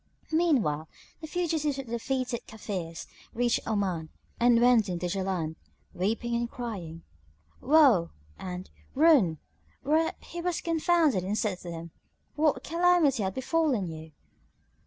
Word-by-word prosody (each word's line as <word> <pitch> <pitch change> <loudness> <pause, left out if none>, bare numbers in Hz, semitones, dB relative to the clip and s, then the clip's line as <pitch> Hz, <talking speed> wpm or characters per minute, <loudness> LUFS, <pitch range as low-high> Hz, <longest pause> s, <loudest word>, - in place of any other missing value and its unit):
Meanwhile, 240 - +1 0.3
the 315 - -7
fugitives 310 -4 -1
of 275 - -5
the 230 - -11
defeated 250 0 -2
Kafirs 185 -6 -6 0.3
reached 240 0 +2
Oman 190 -7 -1 0.3
and 240 0 +5
went 240 -4 +4
in 175 - -2
to 175 - -4
Jaland, 180 -4 -2 0.4
weeping 225 +6 -1
and 235 0 -1
crying, 185 -11 -6 0.6
"Woe!" 260 - +5 0.3
and 180 0 -6 0.2
"Ruin!" 270 - +5 0.5
whereat 315 +3 +2
he 345 - -7
was 355 -1 -1
confounded 325 - +2
and 200 +3 -2
said 205 -6 -1
to 175 - -8
them, 165 0 -7 0.4
"What 305 -1 +1
calamity 335 -6 +3
hath 190 -1 -2
befallen 260 - 0
you?" 160 0 -9
235 Hz, 135 wpm, -28 LUFS, 180-300 Hz, 0.6 s, and